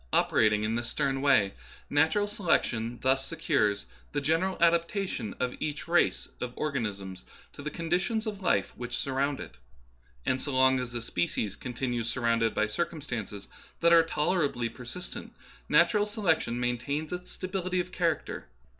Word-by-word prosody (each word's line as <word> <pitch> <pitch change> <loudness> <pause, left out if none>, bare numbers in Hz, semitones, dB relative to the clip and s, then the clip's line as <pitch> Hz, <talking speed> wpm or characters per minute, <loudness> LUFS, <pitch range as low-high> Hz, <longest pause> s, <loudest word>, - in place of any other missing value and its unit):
Operating 105 -1 +3
in 110 +1 0
this 120 +1 -2
stern 135 -1 0
way, 135 -9 +4 0.3
natural 160 +8 +3
selection 120 - 0 0.2
secures 105 - 0 0.3
the - - +1
general 165 +6 +1
adaptation 170 - +1
of 125 -1 0
each 150 +1 -3
race 175 +1 +2
of 125 -1 -4
or 155 -1 -2
ganisms 100 -7 -3 0.3
to - - -9
the 150 - -3
conditions 180 +8 -1
of 205 -2 -4
life 100 - +1
which 120 0 -4
surround 140 +1 0
it. 60 - -9 0.7
And 130 0 +1
so 145 - -4
long 130 0 +5
as 125 -1 -5
a 120 - -3
species 100 +1 -1
continues 120 -1 -3
surrounded 115 -2 +1
by 110 - +3
circumstances 115 - -4 0.3
that 170 0 +5
are 165 - +9
tolerably 150 -6 0
persistent, 125 +10 -8 0.3
natural 210 -2 +4
selection 165 - +1
maintains 135 +6 -1
its 180 0 -5
stability 185 -1 -2
of 180 0 -2
char 170 -3 +2
acter. - - -8
140 Hz, 150 wpm, -29 LUFS, 115-170 Hz, 0.7 s, are